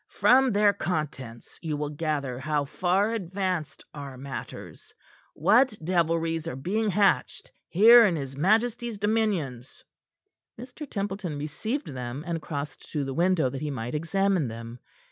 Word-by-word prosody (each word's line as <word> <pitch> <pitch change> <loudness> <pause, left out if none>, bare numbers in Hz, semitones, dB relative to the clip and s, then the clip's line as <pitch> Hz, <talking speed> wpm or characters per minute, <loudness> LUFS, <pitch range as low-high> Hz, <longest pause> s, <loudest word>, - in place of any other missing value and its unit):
From 260 0 +4
their 205 0 +4
contents, 145 - -5
you 155 -3 -3
will 150 0 -3
gather 145 -5 -2
how 145 +1 -1
far 185 +8 +1
advanced 185 -5 -3
are 140 -3 -8
matters, 135 0 -8 0.4
what 220 - +4
devilries 165 -1 0
are 165 - -4
being 205 +11 -1
hatched 200 +1 +1 0.2
here 230 +6 +8
in 180 - 0
his 135 -3 -5
majesty's 225 - +1
dominions." 195 - -1 0.8
Mr. 260 +4 -9
Templeton 195 -6 -3
received 195 - -3
them, 125 +1 -5
and 170 -2 -3
crossed 145 -3 -6
to 150 -3 0
the 135 - -4
window 170 -2 +2
that 135 - -6
he 150 - -2
might 125 -3 -4
examine 180 +1 +1
them. 115 +1 -8
165 Hz, 140 wpm, -27 LUFS, 140-205 Hz, 0.8 s, here